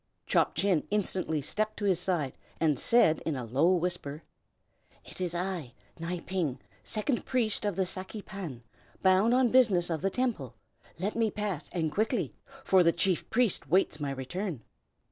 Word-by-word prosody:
Chop - - +2
Chin 190 -6 +1
instantly 185 -6 0
stepped 215 +9 -2
to 205 - -3
his 185 -4 +3
side, 175 -7 -1 0.2
and 150 -5 +2
said 200 -10 +4
in 160 - -2
a 125 -2 -4
low 140 +10 +3
whisper, 170 -4 -3 0.8
"It - - -9
is 175 -1 -1
I, 175 -8 -3 0.2
Nai 170 +1 -3
Ping, 170 -8 -2 0.2
second 225 +4 -1
priest 225 -5 0
of 205 -3 0
the 190 0 +1
Saki 190 +3 -4
Pan, 165 - -7 0.4
bound 190 +5 +5
on 255 -1 +4
business 205 -9 +4
of 160 - -1
the 195 - +1
Temple. 195 - -2 0.4
Let 195 +5 -2
me 225 -1 +2
pass, 200 -7 -3
and 160 -3 -1
quickly, 220 - 0 0.3
for 190 -1 +5
the 170 -1 +5
chief 180 +1 0
priest 225 - +1
waits 180 -2 +2
my 145 -2 -2
return." 140 - -4
180 Hz, 165 wpm, -29 LUFS, 160-210 Hz, 0.8 s, bound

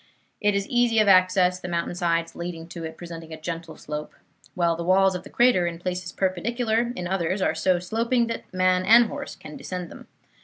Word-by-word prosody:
It 205 -2 +2
is 200 0 -1
easy 240 -2 +2
of 215 -1 +4
access, 185 -1 +4
the 180 - -7
mountain 170 0 -2
sides 170 -2 -1
leading 170 -1 -6
to 170 -1 -7
it 160 0 -8
presenting 165 -2 -9
a 160 - -7
gentle 165 0 -6
slope; 150 0 -6 0.4
while 170 -2 +2
the 170 - -4
walls 190 +2 +4
of 180 - -4
the - - -13
crater, 240 -8 +3
in 170 -1 -4
places 180 0 -4
perpendicular, 225 +5 0
in 180 - -4
others 185 +1 -1
are 185 - +1
so 175 +3 +2
sloping 230 +7 0
that 230 - -6
man 185 0 +2
and 230 +5 +7
horse - - -6
can 150 - -11
descend 180 -2 -6
them. - - -12
180 Hz, 205 wpm, -25 LUFS, 170-200 Hz, 0.4 s, and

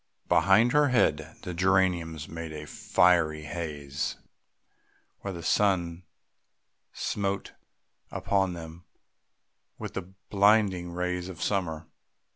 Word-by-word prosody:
Behind 110 +5 +5
her 150 +1 +4
head 80 - +1
the 90 - -4
geraniums 85 -3 +1
made 80 -1 -6
a 75 -1 -7
fiery 80 -2 +2
haze 75 -3 -4 1.0
where 100 - -5
the 85 -2 -7
sun 90 -2 +1 0.9
smote 100 -1 -2 0.6
upon 95 -2 0
them 85 0 -9 0.9
with - - -6
the 95 -1 -6 0.2
blinding 100 -3 +3
rays 90 +1 -2
of 90 -3 -9
summer. 85 -5 -1
90 Hz, 100 wpm, -28 LUFS, 80-95 Hz, 1.0 s, Behind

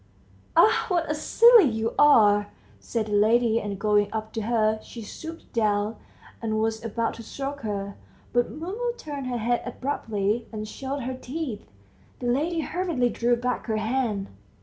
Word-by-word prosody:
"Ah, 445 +1 +5
what 345 -5 0
a 305 - 0
silly 460 +7 +6
you 225 0 -2
are!" 205 -8 +6 0.3
said 230 -2 -2
the 210 - -7
lady, 225 +2 +3
and 200 -1 -4
going 205 0 +2
up 220 0 -4
to 225 - -2
her, 220 -1 +1
she 230 0 -9
stooped 325 +9 -9
down, 210 -1 +1 0.5
and 220 -1 -1
was 220 0 -1
about 230 0 -1
to - - -9
stroke 275 +5 -5
her, 200 -2 -4 0.4
but 240 0 +2
Mumu 425 +10 -4
turned 285 -4 -6
her 245 -1 -2
head 235 +1 0
abruptly, 225 -4 -2
and 215 -1 -5
showed 270 +4 -5
her 260 +2 -3
teeth. 255 - -6 0.5
The 250 - -7
lady 310 +7 +1
hurriedly 325 -8 0
drew 240 +1 +2
back 250 +1 -2
her 220 -1 0
hand. 220 -3 -1
235 Hz, 165 wpm, -26 LUFS, 215-280 Hz, 0.5 s, silly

